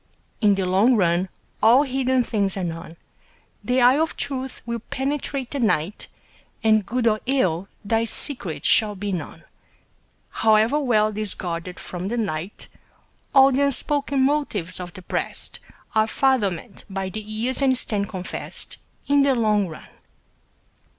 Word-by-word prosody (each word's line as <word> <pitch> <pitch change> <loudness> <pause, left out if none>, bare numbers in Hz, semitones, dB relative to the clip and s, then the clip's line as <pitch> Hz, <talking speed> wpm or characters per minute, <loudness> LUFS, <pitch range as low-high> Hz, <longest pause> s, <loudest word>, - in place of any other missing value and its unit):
In 205 -2 +4
the 195 -1 -1
long 200 +8 +4
run 180 -2 +1 0.3
all 235 +6 +6
hidden 260 -2 +1
things 200 -4 -1
are 190 - -2
known, 165 -1 -6 0.7
The 250 +1 +1
eye 250 +4 +5
of 320 0 -1
truth 265 -2 -4
will 235 -1 -3
penetrate 270 +1 -3
the 280 - -3
night, 205 -5 0 0.6
And 215 -1 +4
good 245 +4 -2
or 215 -2 +3
ill, 190 -9 +1 0.2
thy 225 +2 +1
secret 220 - +1
shall 210 -2 +4
be 200 +1 -4
known, 180 -3 -6 0.9
However 220 +6 +3
well 215 -6 +2
'tis 210 -1 -1
guarded 175 0 -5
from 180 +1 -6
the 235 +4 -2
light. 195 -4 -4 0.7
All 270 0 +7
the 275 +2 +2
unspoken 280 0 0
motives 220 - -1
of 180 -1 -6
the 185 - -11
breast - - -4 0.3
Are 220 -1 +3
fathomed 225 -7 0
by 195 -1 -3
the 215 +3 -5
years 220 +6 -1
and 260 -2 +3
stand 205 -4 0
confess'd 185 -3 -4 0.3
In 285 0 +3
the 275 -1 +3
long 210 -4 +2
run. 160 - -10
215 Hz, 150 wpm, -23 LUFS, 190-260 Hz, 0.9 s, All